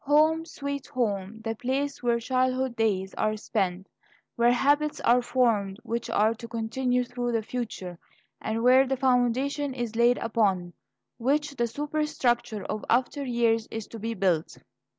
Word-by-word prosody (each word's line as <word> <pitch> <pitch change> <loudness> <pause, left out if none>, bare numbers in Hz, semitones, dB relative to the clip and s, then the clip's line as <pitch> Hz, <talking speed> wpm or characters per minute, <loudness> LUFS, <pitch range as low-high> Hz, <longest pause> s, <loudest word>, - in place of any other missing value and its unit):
"Home, 310 +3 +4
sweet 280 -3 -5
home!" 215 -3 -2
the 225 0 -1
place 275 +5 -2
where 240 -1 +2
childhood 255 +1 0
days 195 -4 0
are 215 0 +1
spent, 195 -4 -2 0.5
where 235 +1 +4
habits 290 +4 +2
are 245 +1 +4
formed 225 -6 +1
which 235 +1 -3
are 220 -1 +3
to 230 +1 -9
continue 245 +2 0
through 245 -1 -3
the 225 -1 0
future, 210 -7 -5 0.4
and 225 +1 -2
where 260 +2 +6
the 265 0 0
foundation 260 +2 +1
is 240 -3 -4
laid 240 +1 +4
upon 195 -6 0 0.5
which 285 +4 0
the 240 -2 0
superstructure 250 -6 -1
of 215 0 -4
after 260 +4 +1
years 235 -3 +1
is 225 -1 -5
to 230 - -8
be 225 +2 -3
built. 180 -5 0
240 Hz, 150 wpm, -27 LUFS, 220-260 Hz, 0.5 s, where